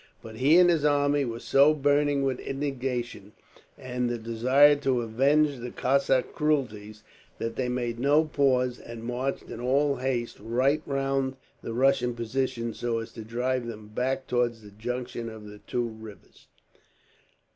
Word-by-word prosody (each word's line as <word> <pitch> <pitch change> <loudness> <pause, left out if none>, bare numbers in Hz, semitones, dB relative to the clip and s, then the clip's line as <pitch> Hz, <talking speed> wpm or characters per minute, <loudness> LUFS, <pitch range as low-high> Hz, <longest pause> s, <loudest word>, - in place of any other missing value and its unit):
But 110 -1 -10
he 145 +8 +5
and 180 0 +7
his 165 -4 +2
army 145 -1 +2
were 115 -1 -4
so 140 +5 +4
burning 145 0 +2
with 130 -2 -1
indignation, 130 -6 -4 0.4
and 125 -1 -3
the 120 - -2
desire 130 +6 +4
to 135 -3 0
avenge 140 +5 +2
the 125 0 -6
Cossack 135 0 +1
cruelties, 110 -9 -2 0.3
that 115 0 -4
they 125 -2 -1
made 120 -2 -2
no 145 +4 +4
pause, 130 -4 +1
and 115 -1 -9
marched 125 +3 -3
in - - -7
all 140 +3 +1
haste 125 -2 -2
right 130 +7 +1
round 135 -1 -1 0.3
the 115 - -5
Russian 125 -1 +2
position, 120 0 -2
so 120 0 -2
as 115 0 -5
to 115 - -9
drive 120 +2 -2
them 110 -2 -8
back 130 +4 -2
towards 120 -2 -1
the 105 - -13
junction 120 +2 -5
of 110 -1 -10
the 105 0 -11
two 120 -1 -1
rivers. 110 -4 -13
125 Hz, 155 wpm, -27 LUFS, 115-140 Hz, 0.4 s, and